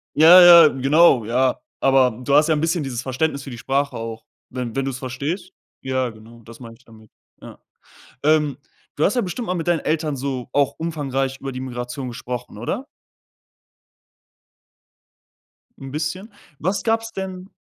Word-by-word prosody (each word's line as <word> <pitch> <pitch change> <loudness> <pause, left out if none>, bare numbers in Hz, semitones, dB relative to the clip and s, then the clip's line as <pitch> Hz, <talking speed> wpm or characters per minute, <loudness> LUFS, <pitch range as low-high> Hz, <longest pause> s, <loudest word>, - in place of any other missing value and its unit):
ja, 165 +4 +9 0.3
ja, - - +6
genau, 135 -2 +3
ja, 125 +3 0 0.2
aber 135 -2 +4
du 140 +2 0
hast 150 +2 +5
ja 160 - +3
'n 150 - -1
bisschen 165 0 0
dieses 125 -3 -4
Verständnis 140 +2 -2
für 135 - -8
die 120 - -8
Sprache 140 +3 -1
auch, 115 0 -7 0.3
wenn 125 -3 -5
wenn 135 - 0
du's 135 -1 -4
verstehst. 145 +9 -5 0.3
Ja, 130 -2 -1
genau, 115 +1 -15
das 115 +3 -14
meine 115 -2 -10
ich 130 - -27
damit, 110 -1 -18 0.3
ja. - - -12 0.7
Ähm, 150 -2 +2 0.4
du 150 - +1
hast 205 - +2
ja 245 - +2
bestimmt 205 +5 -5
mal 180 - -1
mit 170 -1 -4
deinen 170 -3 +2
Eltern 155 -2 -1
so 130 -2 -4
auch 140 -2 +1
umfangreich 135 -5 -3
über 135 -1 -5
die 130 - -6
Migration 125 +1 -6
gesprochen, 120 -2 -7
oder? 210 - -4 2.9
'N 135 -2 -9
bisschen? 185 +8 -4 0.3
Was 190 +5 -2
gab's 225 0 -1
denn 190 0 -7
135 Hz, 165 wpm, -21 LUFS, 125-165 Hz, 2.9 s, ja